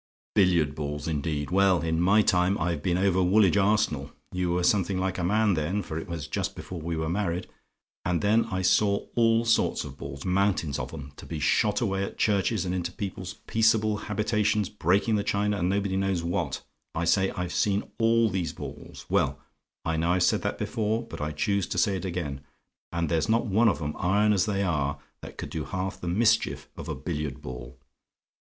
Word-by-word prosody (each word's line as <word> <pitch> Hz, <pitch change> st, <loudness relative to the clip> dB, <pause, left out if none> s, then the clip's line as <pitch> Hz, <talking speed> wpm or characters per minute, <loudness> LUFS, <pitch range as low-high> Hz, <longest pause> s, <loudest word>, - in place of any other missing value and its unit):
"Billiard 85 Hz, -7 st, +3 dB
balls, 75 Hz, 0 st, -4 dB
indeed! 75 Hz, -1 st, -2 dB
Well, 95 Hz, -1 st, +4 dB
in 80 Hz, 0 st, 0 dB
my 100 Hz, +4 st, +5 dB
time 90 Hz, +1 st, +2 dB
I've 85 Hz, -2 st, -1 dB
been 90 Hz, +2 st, +1 dB
over 95 Hz, -1 st, +2 dB
Woolwich 95 Hz, +1 st, +4 dB
Arsenal 100 Hz, -9 st, +2 dB, 0.2 s
you 90 Hz, -1 st, -1 dB
were 90 Hz, +1 st, 0 dB
something 95 Hz, 0 st, +2 dB
like 95 Hz, 0 st, -1 dB
a -, -, -1 dB
man 105 Hz, +3 st, +3 dB
then, 90 Hz, +6 st, -1 dB
for 80 Hz, -2 st, -4 dB
it -, -, -8 dB
was 85 Hz, -4 st, -5 dB
just -, -, -2 dB
before 90 Hz, -3 st, -7 dB
we 85 Hz, +1 st, -3 dB
were 80 Hz, 0 st, -1 dB
married 90 Hz, 0 st, -1 dB, 0.6 s
and 90 Hz, -1 st, 0 dB
then 110 Hz, +3 st, +3 dB
I 95 Hz, 0 st, -3 dB
saw 100 Hz, +2 st, +3 dB
all 115 Hz, 0 st, +3 dB
sorts 115 Hz, -1 st, +2 dB
of -, -, -10 dB
balls; 70 Hz, 0 st, -7 dB
mountains 90 Hz, -6 st, +1 dB
of -, -, -5 dB
'em, 70 Hz, -3 st, -8 dB
to -, -, -11 dB
be 80 Hz, -, -4 dB
shot 105 Hz, -, +2 dB
away 95 Hz, -4 st, 0 dB
at -, -, -6 dB
churches, 100 Hz, -1 st, +1 dB
and 90 Hz, -, -2 dB
into 90 Hz, -1 st, -2 dB
people's 95 Hz, -1 st, -6 dB
peaceable 110 Hz, -1 st, +2 dB
habitations, 105 Hz, 0 st, 0 dB
breaking 105 Hz, +2 st, +1 dB
the 100 Hz, -, 0 dB
china, 105 Hz, +1 st, 0 dB
and 90 Hz, +1 st, +1 dB
nobody 100 Hz, -1 st, 0 dB
knows 95 Hz, -3 st, 0 dB
what 85 Hz, +1 st, -2 dB, 0.3 s
I 85 Hz, +1 st, 0 dB
say, 95 Hz, +2 st, +3 dB
I've 90 Hz, -1 st, -4 dB
seen 100 Hz, 0 st, +1 dB, 0.2 s
all 115 Hz, 0 st, +4 dB
these 90 Hz, -3 st, -2 dB
balls -, -, -9 dB
well, -, -, +1 dB, 0.5 s
I 80 Hz, -1 st, 0 dB
know 85 Hz, +2 st, +2 dB
I've 90 Hz, -1 st, +2 dB
said -, -, +3 dB
that -, -, -2 dB
before; 110 Hz, +1 st, -1 dB
but -, -, -9 dB
I 75 Hz, 0 st, -2 dB
choose 100 Hz, +5 st, 0 dB
to -, -, -4 dB
say 95 Hz, +3 st, +2 dB
it 95 Hz, -, -4 dB
again 85 Hz, -7 st, -3 dB, 0.5 s
and 85 Hz, -1 st, -1 dB
there's 80 Hz, +2 st, 0 dB
not 115 Hz, +1 st, +2 dB
one 110 Hz, +2 st, +4 dB
of 100 Hz, -, -1 dB
'em, 75 Hz, -1 st, -3 dB
iron 105 Hz, +4 st, +3 dB
as 100 Hz, +1 st, +2 dB
they 100 Hz, -1 st, 0 dB
are, 70 Hz, -6 st, 0 dB, 0.2 s
that -, -, -10 dB
could -, -, -6 dB
do -, -, -3 dB
half 95 Hz, +1 st, -4 dB
the 90 Hz, -, -5 dB
mischief 110 Hz, +5 st, +1 dB
of -, -, -7 dB
a -, -, -2 dB
billiard 75 Hz, -2 st, -4 dB
ball. 65 Hz, -1 st, -8 dB
95 Hz, 205 wpm, -27 LUFS, 85-105 Hz, 0.6 s, my